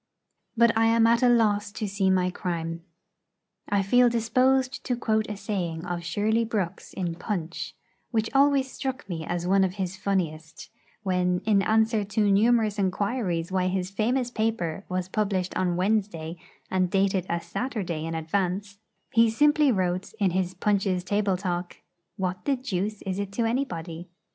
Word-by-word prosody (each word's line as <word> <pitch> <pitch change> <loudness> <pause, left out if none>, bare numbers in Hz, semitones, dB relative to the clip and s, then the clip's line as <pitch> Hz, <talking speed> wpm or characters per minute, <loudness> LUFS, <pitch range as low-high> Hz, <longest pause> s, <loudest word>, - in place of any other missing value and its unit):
But 235 0 +5
I 225 0 +4
am 230 0 +4
at 230 +1 +4
a 250 - +5
loss 210 -3 +2
to 215 - -3
see 195 -1 +1
my 185 -1 +2
crime. 165 -2 -3 0.9
I 200 -1 +2
feel 245 +5 +5
disposed 255 +3 +1
to 245 - -1
quote 220 -2 0
a 210 - -4
saying 180 -5 -3
of 175 -1 -3
Shirley 215 +6 +1
Brooks 210 -6 -3
in 175 -3 -2
Punch, 165 -3 -4 0.3
which 220 -1 0
always 275 -1 +3
struck 265 -6 -4
me 165 -4 -4
as 175 0 -2
one 195 +1 +4
of 185 0 -1
his 190 -1 -3
funniest, 165 -5 -3 0.3
when, 180 -2 +1
in 205 -3 +4
answer 220 +1 +2
to 205 0 +1
numerous 215 0 +3
inquiries 190 -3 -1
why 185 -1 +1
his 185 0 -2
famous 240 +4 0
paper 215 -6 -2
was 185 0 -2
published 190 -2 -1
on 180 -2 +1
Wednesday, 185 -4 -1 0.4
and 185 -1 +2
dated 190 -1 +1
a 170 - 0
Saturday 175 - -3
in 165 0 -3
advance, 195 +4 -2 0.3
he 230 0 +5
simply 295 +4 +4
wrote 185 -2 -1
in 195 -3 +2
his 185 0 -1
'Punch's 195 -2 +1
Table 200 0 +1
talk,' 180 -2 -3 0.4
'What 185 -1 -3
the 280 - +2
deuce 210 -5 -3
is 190 0 -3
it 200 -1 -3
to 230 +2 0
anybody?' 175 -9 -3
195 Hz, 165 wpm, -26 LUFS, 180-225 Hz, 0.9 s, But